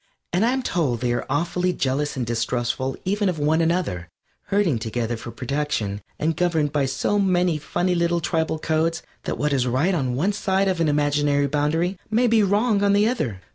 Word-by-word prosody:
And 180 Hz, +4 st, +2 dB
I'm 255 Hz, +3 st, +1 dB
told 145 Hz, -, 0 dB
they 120 Hz, -1 st, +1 dB
are 120 Hz, -, -3 dB
awfully 175 Hz, +4 st, 0 dB
jealous 145 Hz, 0 st, -1 dB
and 125 Hz, -, -1 dB
distrustful 120 Hz, +2 st, -1 dB
even 200 Hz, +1 st, +1 dB
of 175 Hz, -, -2 dB
one 155 Hz, +2 st, +2 dB
another, 160 Hz, -, -1 dB, 0.4 s
herding 195 Hz, -, +1 dB
together 115 Hz, +1 st, -2 dB
for 115 Hz, +1 st, -8 dB
protection 125 Hz, -6 st, -2 dB, 0.2 s
and 160 Hz, +1 st, 0 dB
governed 160 Hz, -4 st, +1 dB
by 140 Hz, -2 st, +1 dB
so 205 Hz, +9 st, 0 dB
many 180 Hz, -4 st, +2 dB
funny 175 Hz, +4 st, -1 dB
little 170 Hz, 0 st, +1 dB
tribal 160 Hz, -1 st, -1 dB
codes 160 Hz, +1 st, 0 dB, 0.2 s
that -, -, -2 dB
what 150 Hz, 0 st, 0 dB
is 130 Hz, -2 st, +1 dB
right 140 Hz, +10 st, +1 dB
on 130 Hz, -7 st, -1 dB
one 185 Hz, +10 st, +1 dB
side 195 Hz, -1 st, +1 dB
of 185 Hz, -3 st, 0 dB
an 165 Hz, -, +3 dB
imaginary 145 Hz, -1 st, +2 dB
boundary 155 Hz, +6 st, 0 dB
may 230 Hz, +3 st, +2 dB
be 230 Hz, -2 st, +4 dB
wrong 205 Hz, +2 st, +2 dB
on 200 Hz, 0 st, +4 dB
the 205 Hz, +2 st, +4 dB
other. 125 Hz, -, -2 dB
160 Hz, 190 wpm, -23 LUFS, 135-185 Hz, 0.4 s, be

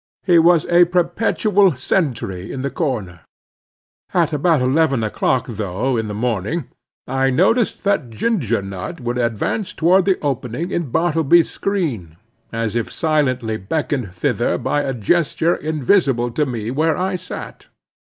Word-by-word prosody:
He 175 Hz, -3 st, +5 dB
was 170 Hz, -1 st, +4 dB
a 175 Hz, 0 st, +5 dB
perpetual 180 Hz, +1 st, +2 dB
sentry 120 Hz, -, -2 dB
in 130 Hz, -, -5 dB
the 140 Hz, -, -2 dB
corner. 115 Hz, -, -3 dB, 1.0 s
At 165 Hz, -3 st, +2 dB
about 150 Hz, +1 st, +2 dB
eleven 135 Hz, -1 st, +2 dB
o'clock 125 Hz, +4 st, 0 dB
though, 110 Hz, +2 st, -2 dB
in 110 Hz, -1 st, -1 dB
the 105 Hz, -, -5 dB
morning, 115 Hz, -, -2 dB, 0.4 s
I 135 Hz, +1 st, +1 dB
noticed 225 Hz, -, +2 dB
that 160 Hz, -, 0 dB
Ginger 115 Hz, -, -1 dB
Nut 95 Hz, -, -6 dB
would 120 Hz, 0 st, -3 dB
advance 120 Hz, -, -2 dB
toward 180 Hz, +3 st, +3 dB
the 190 Hz, -2 st, +2 dB
opening 140 Hz, +4 st, -2 dB
in 170 Hz, -6 st, -2 dB
Bartleby's 165 Hz, +2 st, +3 dB
screen, 130 Hz, -, -3 dB, 0.3 s
as 115 Hz, -1 st, -2 dB
if 120 Hz, -, -2 dB
silently 130 Hz, -8 st, 0 dB
beckoned 125 Hz, -, -2 dB
thither 90 Hz, -, 0 dB
by 145 Hz, -, 0 dB
a 135 Hz, -2 st, -2 dB
gesture 165 Hz, -, +1 dB
invisible 145 Hz, -5 st, +1 dB
to 150 Hz, +5 st, 0 dB
me 115 Hz, -3 st, -4 dB
where 155 Hz, +4 st, +1 dB
I 185 Hz, +1 st, -1 dB
sat. 180 Hz, 0 st, -8 dB
140 Hz, 140 wpm, -19 LUFS, 115-170 Hz, 1.0 s, He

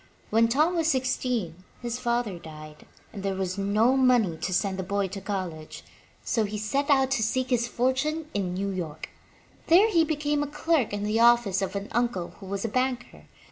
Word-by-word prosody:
When 225 Hz, +2 st, +4 dB
Tom 305 Hz, +9 st, +2 dB
was 325 Hz, -1 st, +1 dB
sixteen, 250 Hz, -, -1 dB, 0.2 s
his 240 Hz, 0 st, -4 dB
father 235 Hz, -6 st, -1 dB
died, 155 Hz, -2 st, -12 dB, 0.3 s
and 200 Hz, -, -6 dB
there 195 Hz, -1 st, -2 dB
was 190 Hz, 0 st, -3 dB
no 215 Hz, +6 st, +3 dB
money 245 Hz, -9 st, +3 dB
to 180 Hz, +3 st, -4 dB
send 190 Hz, +1 st, 0 dB
the -, -, -1 dB
boy 200 Hz, +1 st, -1 dB
to 195 Hz, +1 st, -7 dB
college, 185 Hz, -6 st, -5 dB, 0.4 s
so 225 Hz, -, 0 dB
he 210 Hz, 0 st, -3 dB
set 275 Hz, +8 st, -1 dB
out 270 Hz, -2 st, +3 dB
to 270 Hz, -, +1 dB
seek 255 Hz, +4 st, -1 dB
his 240 Hz, -1 st, +2 dB
fortune 270 Hz, +6 st, -1 dB
in 185 Hz, -3 st, -2 dB
New 200 Hz, +1 st, -2 dB
York. 160 Hz, -5 st, -5 dB, 0.6 s
There 395 Hz, +7 st, +6 dB
he 335 Hz, -4 st, +4 dB
became 295 Hz, -2 st, -1 dB
a 290 Hz, -, -1 dB
clerk 295 Hz, -3 st, 0 dB
in 205 Hz, 0 st, -3 dB
the 210 Hz, +2 st, 0 dB
office 235 Hz, -5 st, +4 dB
of 195 Hz, -, -3 dB
an 200 Hz, +1 st, -3 dB
uncle 235 Hz, -7 st, -1 dB
who 195 Hz, -, -10 dB
was 195 Hz, +2 st, -3 dB
a -, -, +1 dB
banker. 255 Hz, +1 st, -2 dB
225 Hz, 195 wpm, -26 LUFS, 195-260 Hz, 0.6 s, There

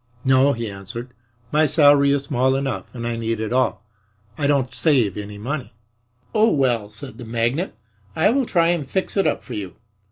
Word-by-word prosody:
"No," 135 Hz, +2 st, +4 dB
he 115 Hz, -1 st, -4 dB
answered. 105 Hz, +5 st, -7 dB, 0.4 s
"My 155 Hz, +1 st, +4 dB
salary 145 Hz, -2 st, +5 dB
is 140 Hz, -1 st, +1 dB
small 130 Hz, -1 st, +1 dB
enough 135 Hz, 0 st, -2 dB
and 120 Hz, -2 st, -6 dB
I 120 Hz, -1 st, -2 dB
need 115 Hz, -1 st, -2 dB
it 110 Hz, +2 st, -3 dB
all. 130 Hz, -2 st, +1 dB, 0.5 s
I 145 Hz, -2 st, 0 dB
don't 140 Hz, -3 st, +1 dB
save 125 Hz, -, +2 dB
any 105 Hz, 0 st, -7 dB
money." 130 Hz, +4 st, -5 dB, 0.6 s
"Oh, 220 Hz, +1 st, +4 dB
well," 120 Hz, -7 st, +1 dB
said 110 Hz, +2 st, -8 dB
the -, -, -7 dB
magnate, 120 Hz, +9 st, -1 dB, 0.4 s
"I 175 Hz, +7 st, +3 dB
will 265 Hz, -1 st, +1 dB
try 170 Hz, -2 st, +3 dB
and 160 Hz, -6 st, -1 dB
fix 190 Hz, +4 st, -2 dB
it 195 Hz, -, +2 dB
up -, -, -1 dB
for 125 Hz, -, -8 dB
you. 100 Hz, -5 st, -6 dB
130 Hz, 190 wpm, -22 LUFS, 115-145 Hz, 0.6 s, salary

